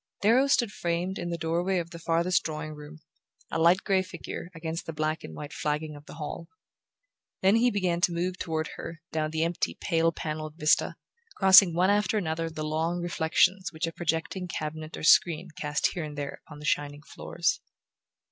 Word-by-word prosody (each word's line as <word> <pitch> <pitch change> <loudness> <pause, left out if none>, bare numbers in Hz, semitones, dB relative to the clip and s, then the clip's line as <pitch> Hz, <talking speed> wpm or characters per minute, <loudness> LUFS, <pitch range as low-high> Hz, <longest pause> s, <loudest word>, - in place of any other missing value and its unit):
Darrow 245 +6 +5
stood 240 -6 +2
framed 175 +1 -2
in 175 - -3
the 170 - -2
door 165 +1 -1
way 190 0 +1
of 170 -1 -3
the 170 - -8
farthest 170 +2 +2
drawing 155 -1 -5
room, 150 +1 -11 0.5
a - - -1
light 170 +3 +4
grey 190 -1 +2
figure 175 -1 -7
against 165 +1 -5
the 165 - -4
black 155 +1 -2
and 80 - -8
white 145 0 -7
flagging 150 0 -2
of 145 0 -14
the - - -10
hall; 160 +2 -6 1.0
then 195 +4 +5
he 245 +2 +4
began 185 -6 0
to 175 - +3
move 180 +2 -2
toward 160 -2 -2
her 165 -1 -7
down 155 -1 -1
the 160 +1 -1
empty 170 +1 -1
pale 165 -2 +2
panelled 155 -1 -5
vista, 155 -2 +2 0.4
crossing 190 -3 +7
one 185 +3 +4
after 210 +1 +2
another 165 -3 -1
the 155 -1 -5
long 160 +3 -1
reflections 175 +3 +1
which 160 0 -2
a 165 - -3
projecting 170 +3 -2
cabinet 155 -1 -5
or - - -8
screen 170 +2 +4
cast 150 0 0
here 175 - -3
and 150 -1 -7
there 140 -1 -5
upon 150 - -11
the 150 - -9
shining 145 0 -1
floors. - - -2
165 Hz, 195 wpm, -28 LUFS, 155-180 Hz, 1.0 s, crossing